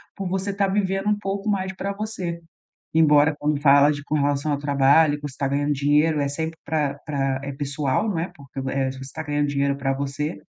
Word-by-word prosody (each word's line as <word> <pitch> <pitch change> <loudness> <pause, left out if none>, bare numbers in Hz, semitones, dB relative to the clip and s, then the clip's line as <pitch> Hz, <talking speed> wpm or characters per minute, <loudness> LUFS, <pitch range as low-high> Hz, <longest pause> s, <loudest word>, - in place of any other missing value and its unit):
por 195 -2 -4
você 190 +2 -2
estar 200 0 0
vivendo 195 0 0
um 210 - +2
pouco 200 +1 -3
mais 190 -1 -1
para 200 +1 -3
você. 200 -5 -4 0.6
Embora 150 -1 +5
quando 145 -1 0
fala 145 0 +6
de 145 -1 -6
com 150 - -3
relação 145 0 +1
ao 140 - 0
trabalho, 145 +2 +4
que 145 - -15
você 130 - -13
tá 140 - 0
ganhando 145 +1 0
dinheiro 150 +3 +2
é 140 - 0
sempre 160 +3 -4
para 145 -2 0
para 135 -3 -1
é 140 - -4
pessoal, 145 +6 -1
não 185 - -1
é? 170 +3 -2
Porque 140 -3 -12
o 130 0 -3
eh, 135 -1 0
você 130 0 -9
está 135 +4 -7
ganhando 145 0 0
dinheiro 140 0 0
para 135 -1 0
você, 140 +3 -3
145 Hz, 225 wpm, -23 LUFS, 140-175 Hz, 0.6 s, fala